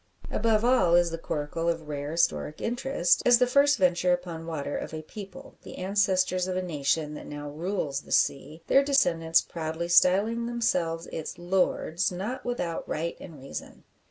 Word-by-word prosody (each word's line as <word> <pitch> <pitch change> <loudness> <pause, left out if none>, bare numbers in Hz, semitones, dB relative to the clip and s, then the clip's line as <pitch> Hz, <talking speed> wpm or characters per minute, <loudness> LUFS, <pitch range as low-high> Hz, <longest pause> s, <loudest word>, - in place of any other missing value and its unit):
Above 220 0 +1
all, 245 -9 +4
is 175 -1 +3
the 165 - -3
coracle 165 +2 -2
of 165 -2 -3
rare 145 0 -4
historic 160 -2 0
interest 240 -6 +1
as 245 -1 +6
the 250 - +4
first 280 +3 +4
venture 180 -2 +2
upon 175 -2 -3
water 150 -3 -4
of - - -5
a 155 - -6
people 195 +3 -11
the - - -10
ancestors 185 -1 +1
of 185 -1 -2
a - - 0
nation 150 -2 -1
that - - -9
now 145 0 -7
rules 150 -2 -3
the - - -16
sea 155 +4 0
their 275 - +4
descendants 165 - +3
proudly 160 0 -4
styling 205 +7 +3
themselves 175 -9 -1
its 160 - -6
"Lords" 175 -1 0
not 205 +9 -4
without 175 -9 -3
right 165 +2 -2
and 160 - -11
reason. 135 +1 -9
175 Hz, 170 wpm, -27 LUFS, 160-205 Hz, -, as